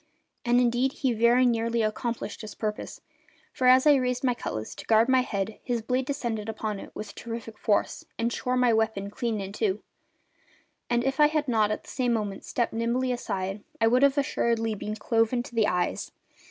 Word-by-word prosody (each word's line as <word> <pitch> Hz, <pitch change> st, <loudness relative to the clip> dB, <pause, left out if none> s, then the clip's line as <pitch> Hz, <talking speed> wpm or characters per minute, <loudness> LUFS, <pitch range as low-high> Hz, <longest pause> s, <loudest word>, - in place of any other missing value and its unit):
And 245 Hz, 0 st, +3 dB
indeed 250 Hz, +2 st, +2 dB
he 260 Hz, -3 st, 0 dB
very 235 Hz, +3 st, +4 dB
nearly 230 Hz, -1 st, +1 dB
accomplished 230 Hz, +2 st, -3 dB
his 215 Hz, -2 st, -8 dB
purpose; 210 Hz, -1 st, -4 dB, 0.5 s
for 255 Hz, -, +1 dB
as 255 Hz, +2 st, +6 dB
I 300 Hz, -, +8 dB
raised 250 Hz, 0 st, -1 dB
my 250 Hz, -2 st, +3 dB
cutlass 110 Hz, -, -5 dB
to -, -, -10 dB
guard 225 Hz, +1 st, +5 dB
my 260 Hz, -1 st, +4 dB
head 210 Hz, -3 st, -3 dB
his 240 Hz, -3 st, -2 dB
blade 255 Hz, +2 st, -1 dB
descended 230 Hz, -6 st, -3 dB
upon 215 Hz, -2 st, -3 dB
it -, -, -9 dB
with 205 Hz, -1 st, -7 dB
terrific 230 Hz, -1 st, -7 dB
force 205 Hz, -2 st, 0 dB
and 235 Hz, +1 st, 0 dB
shore 250 Hz, 0 st, -1 dB
my 250 Hz, -2 st, +4 dB
weapon 220 Hz, -3 st, 0 dB
clean 225 Hz, 0 st, -2 dB
in 195 Hz, 0 st, -5 dB
two, 210 Hz, -2 st, -1 dB, 1.1 s
and 240 Hz, 0 st, +2 dB
if 270 Hz, +1 st, -1 dB
I 300 Hz, -, +8 dB
had 305 Hz, -1 st, -1 dB
not 220 Hz, -4 st, +2 dB
at 215 Hz, -, -3 dB
the -, -, -14 dB
same 250 Hz, -2 st, 0 dB
moment 205 Hz, -3 st, -3 dB
stepped 240 Hz, -2 st, -1 dB
nimbly 235 Hz, +3 st, 0 dB
aside 195 Hz, -4 st, -3 dB, 0.2 s
I 225 Hz, -, +4 dB
should 250 Hz, +3 st, +3 dB
assuredly 235 Hz, -5 st, +2 dB
have 210 Hz, -, -5 dB
been 210 Hz, 0 st, -4 dB
cloven 230 Hz, +2 st, +1 dB
to 245 Hz, -, -12 dB
the 225 Hz, -2 st, +3 dB
eyes. 180 Hz, -1 st, -1 dB
230 Hz, 195 wpm, -27 LUFS, 215-250 Hz, 1.1 s, I